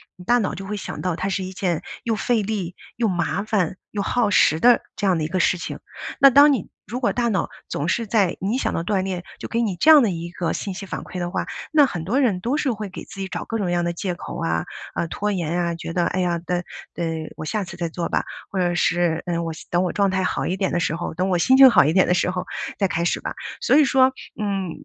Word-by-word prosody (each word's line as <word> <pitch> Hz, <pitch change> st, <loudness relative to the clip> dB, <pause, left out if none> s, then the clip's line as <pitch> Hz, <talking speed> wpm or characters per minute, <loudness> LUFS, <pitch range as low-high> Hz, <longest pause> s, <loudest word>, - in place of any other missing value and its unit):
你 180 Hz, -, -13 dB
大 240 Hz, +6 st, +3 dB
脑 205 Hz, -5 st, -1 dB
就 195 Hz, -, -7 dB
会 210 Hz, +1 st, -4 dB
想 -, -, -6 dB
到 180 Hz, -3 st, -1 dB
它 190 Hz, -, -3 dB
是 190 Hz, -1 st, -1 dB
一 185 Hz, -, -5 dB
件 180 Hz, -3 st, -1 dB, 0.2 s
又 225 Hz, -3 st, 0 dB
费 230 Hz, +1 st, +1 dB
力、 190 Hz, -4 st, -3 dB, 0.2 s
又 230 Hz, -1 st, +1 dB
麻 180 Hz, +2 st, -1 dB
烦、 195 Hz, -5 st, 0 dB, 0.2 s
又 205 Hz, -, -2 dB
耗 225 Hz, +2 st, +1 dB
时 160 Hz, -5 st, +4 dB
的 245 Hz, 0 st, +6 dB
这 205 Hz, -, -3 dB
样 185 Hz, -3 st, +3 dB
的 160 Hz, -, -1 dB
一 -, -, -1 dB
个 185 Hz, +3 st, -1 dB
事 180 Hz, -, +3 dB
情。 -, -, -6 dB, 0.4 s
那 275 Hz, -, +10 dB
当 285 Hz, +2 st, +7 dB
你 220 Hz, -, -3 dB, 0.2 s
如 245 Hz, +4 st, -4 dB
果 240 Hz, -, +2 dB
大 240 Hz, -1 st, 0 dB
脑 200 Hz, -4 st, 0 dB, 0.2 s
总 145 Hz, -, -3 dB
是 230 Hz, +4 st, 0 dB
在 195 Hz, -4 st, +2 dB
你 200 Hz, +5 st, -1 dB
一 -, -, +1 dB
想 -, -, -1 dB
到 165 Hz, -, -1 dB
锻 190 Hz, +1 st, 0 dB
炼， 185 Hz, -2 st, -3 dB, 0.2 s
就 -, -, -6 dB
给 235 Hz, -, 0 dB
你 210 Hz, -6 st, 0 dB
这 310 Hz, -, +5 dB
样 305 Hz, -2 st, +9 dB
的 225 Hz, -, +2 dB
一 170 Hz, -1 st, -5 dB
个 170 Hz, -2 st, -2 dB
信 195 Hz, -, -4 dB
息 195 Hz, +2 st, -7 dB
反 -, -, -5 dB
馈 185 Hz, -, -7 dB
的 175 Hz, 0 st, -2 dB
话， -, -, -2 dB, 0.3 s
那 300 Hz, -2 st, +7 dB
很 175 Hz, -11 st, -4 dB
多 235 Hz, +9 st, +1 dB
人 225 Hz, -10 st, +2 dB
都 240 Hz, +9 st, -1 dB
是 290 Hz, -4 st, +1 dB
会 215 Hz, -2 st, -4 dB
给 190 Hz, -, -8 dB
自 -, -, -11 dB
己 195 Hz, -, -3 dB
找 -, -, -4 dB
各 225 Hz, -, -3 dB
种 205 Hz, -, -1 dB
各 -, -, -1 dB
样 175 Hz, 0 st, +1 dB
的 170 Hz, -, 0 dB
借 175 Hz, +1 st, -3 dB
口 -, -, -7 dB
啊， 80 Hz, 0 st, 0 dB, 0.3 s
啊， -, -, -1 dB
拖 210 Hz, +5 st, -2 dB
延 175 Hz, -1 st, -1 dB
啊， 170 Hz, -1 st, -1 dB
觉 165 Hz, -, -6 dB
得 175 Hz, 0 st, +1 dB
哎 185 Hz, -, 0 dB
呀 175 Hz, -1 st, 0 dB
等 175 Hz, +1 st, -2 dB, 0.3 s
等 170 Hz, -, -3 dB, 0.3 s
我 155 Hz, -, -7 dB
下 210 Hz, +6 st, -1 dB
次 175 Hz, -, -9 dB
再 170 Hz, -1 st, -3 dB
做 170 Hz, +1 st, -3 dB
吧。 -, -, 0 dB, 0.3 s
或 195 Hz, -, -5 dB
者 175 Hz, -1 st, +1 dB
是， 175 Hz, -1 st, +1 dB
嗯， 170 Hz, -1 st, -1 dB
我 165 Hz, -, -3 dB
希 160 Hz, -, -10 dB
等 175 Hz, +1 st, +2 dB
我 180 Hz, -, 0 dB
状 200 Hz, -1 st, +2 dB
态 190 Hz, 0 st, 0 dB
好 -, -, -1 dB
一 180 Hz, -, 0 dB
点 190 Hz, 0 st, -1 dB
的 175 Hz, -, +1 dB
时 165 Hz, -1 st, 0 dB
候， 170 Hz, 0 st, -4 dB
等 180 Hz, +4 st, -1 dB
我 180 Hz, -, +2 dB
心 260 Hz, +10 st, +4 dB
情 270 Hz, -1 st, +10 dB
好 -, -, +6 dB
一 150 Hz, -, +2 dB
点 185 Hz, -, +4 dB
的 -, -, +3 dB
时 180 Hz, -, +1 dB
候 180 Hz, -1 st, -3 dB, 0.3 s
再 195 Hz, -, +3 dB
开 170 Hz, -1 st, -1 dB
始 175 Hz, -, 0 dB
吧。 -, -, -5 dB, 0.3 s
所 -, -, +3 dB
以 305 Hz, -, +7 dB
说， 265 Hz, -1 st, +4 dB, 0.3 s
嗯， 195 Hz, -4 st, -1 dB
185 Hz, 305 characters per minute, -22 LUFS, 175-215 Hz, 0.4 s, 那